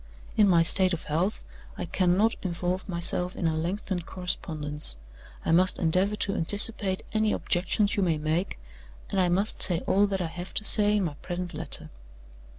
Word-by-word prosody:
"In 210 -2 +5
my 170 -2 +5
state 185 +2 +4
of 170 - -4
health, 175 +8 -2 0.3
I - - -4
cannot 185 +5 +1
involve 180 +1 -3
myself 180 +1 +2
in - - -3
a 160 - 0
lengthened 175 +1 -3
correspondence. 150 - -2 0.5
I - - 0
must 180 +3 +3
endeavor 185 +5 +1
to 200 -1 -1
anticipate 200 +2 0
any 215 -1 +1
objections 200 +4 0
you 205 - 0
may 170 -4 +1
make, 155 +5 -2 0.5
and 195 - +1
I 180 - +2
must 195 +4 0
say 175 -2 -1
all 205 +1 +2
that 195 -1 -2
I 180 - -2
have 175 +3 -8
to - - 0
say 210 0 +6
in 200 - 0
my 165 -4 -2
present 175 -1 -5
letter. - - -2
180 Hz, 175 wpm, -27 LUFS, 170-200 Hz, 0.5 s, say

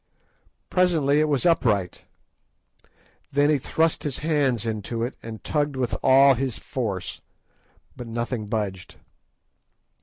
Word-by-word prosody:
Presently 160 -6 +3
it 155 0 +2
was 145 +2 0
upright. 110 - +1 1.3
Then 145 +2 +3
he 145 - +2
thrust 160 +5 0
his 145 -4 -2
hands 135 -8 +1
into 115 +1 -3
it 120 - -4
and 110 -1 -9
tugged 145 -2 -1
with 125 -2 -1
all 135 +1 +6
his 130 -1 -3
force, 105 -8 -4 0.7
but 125 -2 -8
nothing 120 -1 -3
budged. 100 -4 -4
130 Hz, 120 wpm, -24 LUFS, 115-145 Hz, 1.3 s, all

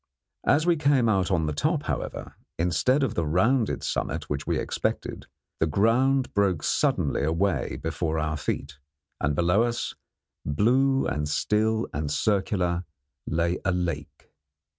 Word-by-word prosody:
As 150 +3 +4
we 175 -1 +3
came 140 -5 +3
out 95 -4 +2
on 85 -5 +1
the 75 - -1
top, 75 - 0
however, - - -4 0.2
instead 125 - +2
of 120 -5 0
the 85 - 0
rounded 110 - +1
summit 80 +1 -3
which 75 0 -3
we - - +1
expected, - - -3 0.3
the 80 - +2
ground 125 - +2
broke 95 -6 +1
suddenly - - +1
away 80 +1 0
before 80 0 -2
our 75 0 -1
feet, 70 0 -4 0.4
and 70 0 0
below 90 +6 +3
us, 120 0 -1 0.5
blue 130 - +2
and 75 +1 -2
still 110 +6 +1
and 75 +1 -2
circular, 90 +1 0 0.4
lay 85 +3 0
a 95 - +1
lake. 90 -2 -4
90 Hz, 140 wpm, -26 LUFS, 80-115 Hz, 0.5 s, As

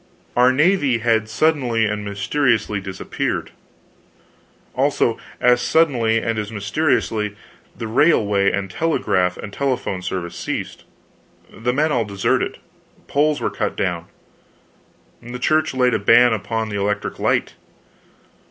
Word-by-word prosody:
"Our 125 +1 +5
navy 145 -2 +2
had 110 -1 +1
suddenly 120 -3 +1
and 105 0 -2
mysteriously 105 +1 0
disappeared! 95 -1 -4 1.2
Also, - - +1 0.2
as 125 0 +4
suddenly 125 -6 +2
and 115 -1 -1
as 105 +1 -4
mysteriously, 105 -1 -1 0.4
the 115 - -5
railway 105 -6 +3
and 100 -1 -3
telegraph 90 - 0
and 100 - -8
telephone 130 -9 -2
service 90 -1 -4
ceased, - - -5 0.7
the 120 +3 -1
men 150 +5 +1
all 125 -5 +1
deserted, 100 -1 -1 0.5
poles 150 +1 +1
were - - -2
cut - - -2
down, 85 -3 -2 1.1
the 120 +1 -7
Church 155 +5 +1
laid 125 -2 +2
a - - +1
ban 120 +4 +5
upon 110 +1 -2
the 100 - -3
electric 105 +1 -2
light! - - 0
115 Hz, 125 wpm, -20 LUFS, 100-130 Hz, 1.2 s, Our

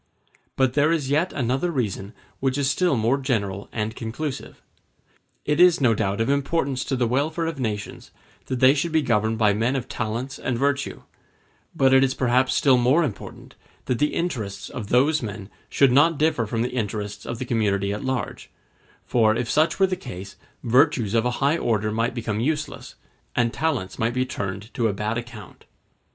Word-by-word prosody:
But 130 -2 +2
there 150 +3 +3
is 145 -5 -1
yet 155 +5 +2
another 130 +6 -1
reason 105 - -3 0.3
which 135 0 0
is 140 -2 +1
still 155 +1 +2
more 115 +5 +1
general 100 -7 -2
and 110 0 -3
conclusive. 130 +5 -5 0.9
It 150 +1 0
is 180 -1 +6
no 125 -5 +4
doubt 100 -2 -1
of 115 - +1
importance 140 -1 0
to 135 - -1
the 125 -1 +1
welfare 150 +7 0
of 160 -3 -4
nations 105 -5 -4 0.4
that 130 -2 -3
they 130 +1 +7
should 150 +3 -1
be 160 -1 +2
governed 110 -3 +1
by 105 -2 +3
men 115 +6 0
of 130 -2 -3
talents 120 +4 -4
and 125 -2 -2
virtue; 140 +1 -1 0.7
but 135 -4 +4
it 135 0 +6
is 130 -1 +1
perhaps 130 +1 +2
still 135 -3 +4
more 130 +7 +3
important 130 -10 -6 0.3
that 125 - -1
the 150 - +1
interests 110 - -3
of 110 -5 -6
those 145 +7 +3
men 105 -3 -7 0.2
should 140 -3 +4
not 145 +5 +4
differ 150 -7 +1
from 115 +1 -1
the 125 - -2
interests 105 -3 -3
of 120 - -5
the 130 - -4
community 100 -4 0
at 105 - -5
large; 130 -3 -3 0.6
for, 110 -2 +3
if 120 0 -2
such 155 +5 +2
were 195 - +6
the 185 -1 -1
case, 100 - -9 0.3
virtues 125 -3 +3
of 115 0 +2
a 125 - +1
high 155 +4 +2
order 105 -2 0
might 115 +3 -1
become 110 -3 -2
useless, 150 +5 -3 0.4
and 120 -1 +1
talents 135 -13 -2
might 115 +1 0
be 130 0 +1
turned 100 -2 -5
to 120 -4 +1
a 105 - -1
bad 105 +3 -2
account. 120 -5 -11
125 Hz, 190 wpm, -24 LUFS, 110-140 Hz, 0.9 s, they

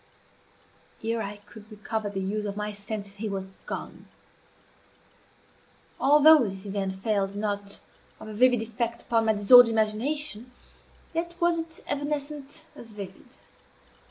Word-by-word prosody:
Ere 225 0 -1
I 205 0 -5
could 210 +1 -15
recover 215 0 -4
the 195 -1 -4
use 210 +3 -2
of 200 0 -4
my 210 0 -3
senses 205 -1 -7
he 215 +1 -3
was 190 -1 -5
gone. - - -7 1.9
Although 295 +1 +7
this 190 0 -7
event 195 -1 -3
failed 200 -3 0
not 205 -1 -3 0.4
of - - -10
a 215 - -7
vivid 245 +1 +4
effect 235 +1 -3
upon 230 -2 +1
my 220 - +3
disordered 230 +4 +8
imagination, 230 +3 -1 0.6
yet 340 +1 -3
was 345 -1 +2
it 325 0 -7
evanescent 290 +1 -3
as 230 -2 -12
vivid. 200 +3 -9
220 Hz, 130 wpm, -27 LUFS, 205-270 Hz, 1.9 s, disordered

